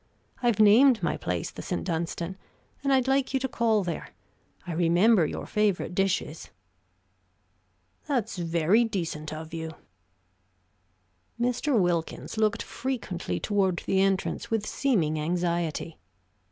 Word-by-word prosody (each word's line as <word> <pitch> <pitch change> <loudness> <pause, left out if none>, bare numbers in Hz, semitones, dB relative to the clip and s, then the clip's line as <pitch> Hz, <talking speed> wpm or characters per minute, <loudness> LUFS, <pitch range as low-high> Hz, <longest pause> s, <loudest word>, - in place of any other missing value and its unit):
I've 240 -4 +2
named 225 +4 +6
my - - +1
place - - -3
the - - -8
St. - - -3
Dunstan, 170 +1 -3 0.5
and 275 - +1
I'd 260 -1 +3
like 270 0 +1
you - - +3
to 265 - -1
call 225 -4 +1
there 170 -3 -5 0.5
I 175 - -4
remember 175 +3 +4
your - - -5
favorite 210 -4 0
dishes." 180 -4 -1 1.6
"That's 240 -8 -1
very 170 +6 +3
decent 165 -8 -3
of 160 +1 -7
you." 160 -1 -5 1.6
Mr. 250 +1 +1
Wilkins 175 0 -1
looked 215 +1 +1
frequently 195 - -4
toward 190 - 0
the 190 - +2
entrance, 195 -1 0
with 225 -2 0
seeming 175 - 0
anxiety. 170 -1 -2
190 Hz, 125 wpm, -27 LUFS, 170-230 Hz, 1.6 s, named